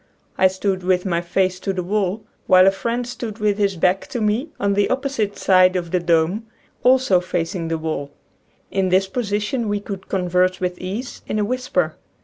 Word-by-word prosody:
I 190 - +5
stood 190 0 -1
with 180 0 +1
my 170 -2 0
face 185 +1 0
to 195 - -2
the 185 -1 -3
wall 205 +2 -1 0.2
while 185 -1 +7
a 195 - +6
friend 235 +5 -2
stood 235 -3 -6
with 210 -1 0
his 200 -2 +1
back 180 +3 +1
to 245 - -4
me 220 +8 0
on 200 0 +1
the 200 0 +2
opposite 260 -6 -1
side 185 -1 +4
of 170 -2 -2
the 180 - +2
dome, 170 +6 +1 0.3
also 255 -7 +4
facing 175 -1 -3
the 165 0 -1
wall. 155 -3 -3 0.6
In 190 -1 +1
this 190 +1 +3
position 210 +2 -2
we 205 0 0
could 200 -2 -8
converse 180 -1 +1
with 180 -1 -2
ease 205 +8 -5
in - - -2
a 210 - +1
whisper. 205 -9 -1
195 Hz, 190 wpm, -21 LUFS, 180-210 Hz, 0.6 s, while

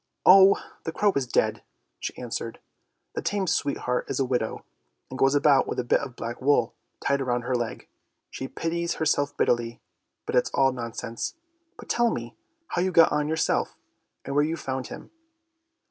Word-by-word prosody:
" - - -55
Oh, 195 +1 +8 0.2
the 165 - -3
crow 205 +4 +2
is 135 -2 0
dead! - - +1 0.2
" - - -50
she - - -5
answered. 115 -1 -5 0.3
" - - -52
The - - -3
tame 200 -2 -1
sweet 145 -5 0
heart 125 0 -2
is - - -2
a 135 - +2
widow, 125 -3 -2 0.5
and 130 - -6
goes 135 +1 +4
about 140 -1 +4
with - - -3
a 125 - 0
bit 120 - +3
of 135 -4 -7
black 115 +2 -6
wool 130 -3 +3 0.3
tied 140 0 +1
round 120 -2 -1
her 130 - -2
leg. 120 -2 -3 0.4
She 130 - -5
pities 170 +4 -2
herself 145 -2 0
bitterly, 120 -1 +1 0.5
but - - -4
it's 125 - +3
all 135 -1 +4
nonsense! 115 - -5 0.4
But - - -12
tell 240 0 +2
me 120 - -5 0.3
how 175 - 0
you 185 +1 +1
got 165 -2 +6
on 150 0 +1
yourself, 160 +1 0 0.5
and 140 - -4
where 145 +1 +4
you 160 +2 -1
found 130 -4 -4
him." - - -10
135 Hz, 190 wpm, -26 LUFS, 120-160 Hz, 0.5 s, Oh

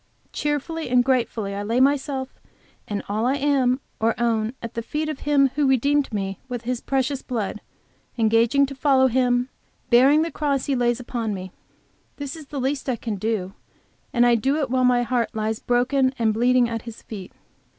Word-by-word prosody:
"Cheerfully 295 +1 -2
and 245 0 +4
gratefully 230 -6 0
I 200 - -3
lay 225 +4 0
myself 270 -1 0 0.5
and 205 -1 -3
all 215 +3 -1
that 265 - +2
I - - -2
am 270 -3 +2 0.2
or 225 +2 +1
own 230 0 0
at 230 -1 -7
the 230 - -3
feet 300 +7 -3
of 305 - -4
Him 280 -2 +3
who 290 -1 +1
redeemed 280 +2 +2
me 195 -2 -3
with 245 -2 -4
His 245 0 -2
precious 270 0 -1
blood, 220 -4 -4 0.6
engaging 230 +5 +3
to 275 - -7
follow 270 -1 +3
Him, 250 0 +2 0.4
bearing 275 +6 +6
the 330 - -3
cross 280 -3 -1
He 280 - 0
lays 240 -1 +1
upon 230 -4 -3
me." 185 -1 -7 0.7
This 285 0 -5
is 310 -3 -11
the 280 0 -5
least 270 +1 -2
I 255 - +1
can 225 -2 -4
do, 195 -2 -2 0.6
and 240 -1 +3
I 240 - +5
do 265 +5 +1
it 275 -4 -2
while 255 0 +2
my 245 -1 +3
heart 240 -1 -1
lies 220 0 -1
broken 260 +2 +1
and 225 -2 +2
bleeding 245 +2 +3
at 230 -1 -4
His 230 -1 -10
feet. 195 -4 -8
250 Hz, 190 wpm, -23 LUFS, 230-275 Hz, 0.7 s, bearing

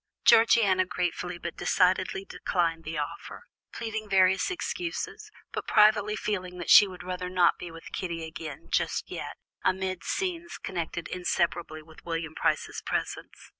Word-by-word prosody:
Georgiana 225 -5 +6
gratefully 180 -1 -3
but 170 0 -6
decidedly 185 +1 +2
declined 165 -4 -1
the 160 0 -4
offer, 150 - -5 0.3
pleading 220 -2 -5
various 190 -1 +4
excuses, 355 -1 -4 0.2
but - - -5
privately 210 0 +5
feeling 185 -4 -3
that 175 - -2
she 205 - +10
would 185 -1 -9
rather 180 0 -4
not 180 -2 +3
be 175 - -6
with 165 0 -11
Kitty 170 -3 -3
again 160 -2 -8
just - - 0
yet, - - -6 0.3
amid 185 -1 0
scenes 345 -3 -3
connected 175 -1 -4
inseparably 175 -3 -1
with 160 0 -17
William 165 -1 -3
Price's - - -1
presence. - - -4
180 Hz, 140 wpm, -28 LUFS, 170-205 Hz, 0.3 s, she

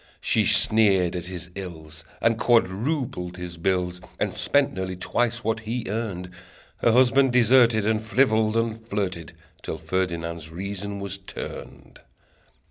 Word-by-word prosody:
She - - +1
sneered 100 -5 +4
at 90 0 -4
his 90 -1 -7
ills, 80 -4 -8 0.2
And 115 -1 +2
quadrupled 115 - 0
his 90 -1 -7
bills, 90 0 -1 0.2
And - - -1
spent 145 0 +2
nearly 95 -1 -4
twice 120 +5 -1
what 110 0 0
he 115 +2 -4
earned; 95 -4 -4 0.5
Her 115 - +3
husband 130 +2 +4
deserted, 120 -3 +5
And 110 0 +1
frivoled, 110 -2 +2
and 115 -1 -1
flirted, 95 -7 -3 0.3
Till - - -5
Ferdinand's 85 -3 -3
reason 100 +3 -5
was 100 0 -4
turned. 95 - -9
100 Hz, 130 wpm, -25 LUFS, 90-115 Hz, 0.5 s, deserted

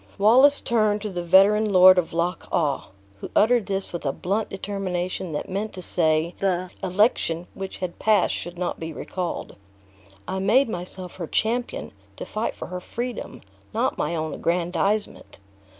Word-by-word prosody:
Wallace 255 +8 +5
turned 215 -3 +1
to 210 - -3
the 175 -1 -3
veteran 200 +5 +5
Lord 185 0 +8
of 170 - -3
Loch 170 +2 -2
awe, 150 -7 0 0.3
who - - -7
uttered 230 0 +4
this 195 -2 -3
with 170 - -4
a 135 - 0
blunt 200 +9 -2
determination 185 -3 -3
that 150 - -3
meant 200 +3 -3
to 185 - -7
say, 160 0 +2
the 185 -2 -1
election 185 -3 +1
which 195 0 -6
had 180 -2 -5
passed 210 -3 +3
should 175 +1 -5
not 180 0 -3
be 160 0 -5
recalled. 175 +2 -5 0.7
"I 190 - -2
made 225 +9 +4
myself 180 -1 -5
her 170 -3 -5
champion, 240 +7 -1 0.2
to - - -7
fight 215 +2 -3
for - - -8
her 180 0 -5
freedom, 235 - -6 0.3
not - - 0
my 170 +3 -1
own 155 -1 -3
aggrandizement. 180 +5 -1
185 Hz, 165 wpm, -24 LUFS, 175-210 Hz, 0.7 s, Lord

